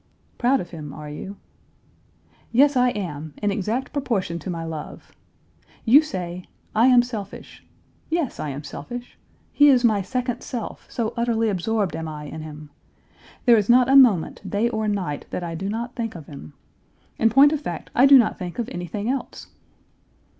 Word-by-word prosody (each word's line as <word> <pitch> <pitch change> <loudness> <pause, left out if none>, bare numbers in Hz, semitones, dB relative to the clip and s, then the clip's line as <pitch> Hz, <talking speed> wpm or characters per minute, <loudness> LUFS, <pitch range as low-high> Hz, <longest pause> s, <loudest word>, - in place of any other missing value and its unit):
'Proud 260 +2 +3
of 175 - -7
him, 150 -4 -8
are 150 0 -8
you?' 195 +7 -8 1.1
Yes, 280 +4 +4
I 250 0 +4
am, 160 -9 -5
in 205 -1 0
exact 220 +6 -2
proportion 205 - -2
to 185 - -7
my 165 -2 -4
love. 160 -2 -8 0.7
You 260 +6 +7
say, 180 - -6 0.2
' - - -35
I - - +7
am 250 -2 +6
selfish.' 225 -5 -8 0.5
Yes, 325 -5 -1
I 150 - -3
am 140 +2 -6
selfish. 240 +13 -8 0.3
He 290 0 +6
is 255 -3 +4
my 215 -4 +3
second 250 +4 -3
self, 240 -3 -6
so 225 -2 -2
utterly 230 -1 +1
absorbed 200 -1 -1
am 160 0 -4
I 150 -1 -7
in 155 +2 -7
him. 150 -1 -10 0.7
There 240 -2 +7
is 210 0 0
not 250 +1 +5
a 270 - +5
moment, 235 -12 +4
day 215 +4 +1
or 220 -2 -2
night, 185 -8 -3
that 180 - -4
I 170 -1 -4
do 190 +4 -4
not 235 +3 -4
think 225 -4 -4
of 160 -4 -9
him. 140 - -11 0.7
In 225 - +4
point 275 +5 +6
of 300 - -2
fact, - - -6
I 260 +3 +6
do 275 0 +9
not 235 -4 +2
think 180 -2 -6
of 240 - -2
anything 175 +5 -5
else." 260 0 -4
215 Hz, 180 wpm, -23 LUFS, 170-245 Hz, 1.1 s, do